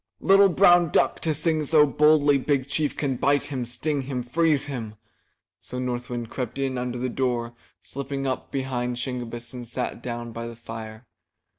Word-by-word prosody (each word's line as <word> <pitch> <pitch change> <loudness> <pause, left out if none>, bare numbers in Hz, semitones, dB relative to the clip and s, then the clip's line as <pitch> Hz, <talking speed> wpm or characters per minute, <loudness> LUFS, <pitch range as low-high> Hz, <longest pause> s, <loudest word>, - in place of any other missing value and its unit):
''Little 195 +1 +6
brown 175 -3 +6
duck - - +2
to 160 -2 0
sing 155 +1 +1
so 150 0 +5
boldly! 145 -1 +4
Big 135 -1 0
Chief 150 +1 -1
can 135 -4 -1
bite 145 +2 +2
him, 130 -4 -3
sting 140 +4 -2
him, 130 -2 -4
freeze 150 +3 +1
him!" 115 -7 -5 0.6
So 110 +6 -8
North 125 -1 -3
Wind 120 -2 -4
crept 125 -1 -4
in 135 -1 -1
under 125 0 -3
the 125 +1 -1
door, 120 -2 -1 0.3
slipped 140 0 -7
up 130 -1 -2
behind 125 -2 -2
Shingebiss 120 -2 -5
and 120 -2 -7
sat 125 0 -4
down 120 -1 -5
by 115 +1 -5
the 115 - -8
fire. 115 0 -9
130 Hz, 175 wpm, -25 LUFS, 120-145 Hz, 0.6 s, Little